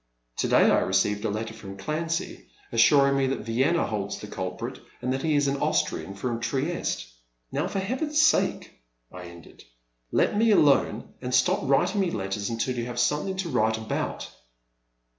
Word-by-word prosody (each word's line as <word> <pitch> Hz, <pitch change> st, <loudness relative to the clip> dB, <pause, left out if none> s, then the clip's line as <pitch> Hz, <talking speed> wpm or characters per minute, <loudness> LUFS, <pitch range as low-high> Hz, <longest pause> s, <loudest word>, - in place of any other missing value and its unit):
To -, -, 0 dB
day -, -, +5 dB
I -, -, +4 dB
received 105 Hz, 0 st, +1 dB
a -, -, +1 dB
letter 110 Hz, +2 st, -4 dB
from 100 Hz, -3 st, -10 dB
Clancy, 165 Hz, -, -3 dB, 0.2 s
assuring 140 Hz, +4 st, +5 dB
me 135 Hz, -1 st, +2 dB
that 135 Hz, -, -2 dB
Vienna 135 Hz, +9 st, +1 dB
holds 100 Hz, -2 st, -3 dB
the -, -, -8 dB
culprit, 100 Hz, +5 st, -5 dB, 0.2 s
and 125 Hz, +1 st, -1 dB
that 135 Hz, -, -2 dB
he 155 Hz, 0 st, +1 dB
is 145 Hz, -1 st, +2 dB
an 140 Hz, 0 st, 0 dB
Aus -, -, +2 dB
trian 100 Hz, 0 st, -7 dB
from 120 Hz, +2 st, -2 dB
Trieste. 135 Hz, -, -2 dB, 0.5 s
Now -, -, -1 dB
for -, -, -4 dB
Heaven's 260 Hz, +10 st, -1 dB
sake,*' 310 Hz, 0 st, +2 dB, 0.3 s
I 90 Hz, -1 st, -9 dB
ended, 85 Hz, -1 st, -13 dB, 0.5 s
let -, -, +2 dB
me 225 Hz, +2 st, +3 dB
alone 140 Hz, -, +3 dB
and 125 Hz, 0 st, -1 dB
stop 130 Hz, -, +3 dB
writing 140 Hz, +9 st, +2 dB
me 185 Hz, -, +1 dB
letters 100 Hz, -4 st, -3 dB
until 115 Hz, +2 st, -2 dB
you 120 Hz, -1 st, -3 dB
have 120 Hz, -1 st, -6 dB
something 150 Hz, +10 st, 0 dB
to 190 Hz, -3 st, -3 dB
write 110 Hz, -4 st, +1 dB
about. 110 Hz, 0 st, -3 dB
125 Hz, 180 wpm, -26 LUFS, 110-155 Hz, 0.5 s, day